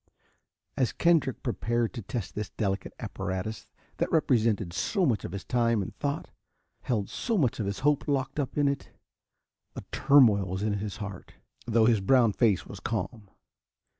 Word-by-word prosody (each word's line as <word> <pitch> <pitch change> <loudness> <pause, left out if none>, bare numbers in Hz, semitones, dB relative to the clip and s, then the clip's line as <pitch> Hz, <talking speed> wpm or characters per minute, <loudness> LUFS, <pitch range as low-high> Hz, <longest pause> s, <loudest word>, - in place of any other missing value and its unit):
As 130 -4 +1
Kendrick 165 -6 +2
prepared 120 -2 -1
to 120 - -5
test 110 0 -5
this 105 0 -4
delicate 100 -2 -2
apparatus 95 +3 -4 0.3
that - - -1
represented 110 - +2
so 185 - 0
much 115 -8 +1
of - - -5
his 100 0 -5
time 115 -2 +2
and - - -8
thought, 140 0 -3 0.5
held 105 -5 -1
so 230 -3 -2
much 130 -10 +1
of 105 - -1
his 100 +4 -3
hope 145 +1 +2
locked 140 0 -1
up 140 0 -3
in 145 -1 +3
it, 140 0 -2 0.9
a - - -6
turmoil 115 -9 +5
was 95 +2 -3
in 105 -1 +1
his 100 -1 -5
heart, 105 -3 -8 0.3
though 115 -1 +4
his 110 -3 +3
brown 120 0 +4
face 105 -6 +2
was - - -9
calm. 105 -4 -4
115 Hz, 165 wpm, -28 LUFS, 100-135 Hz, 0.9 s, turmoil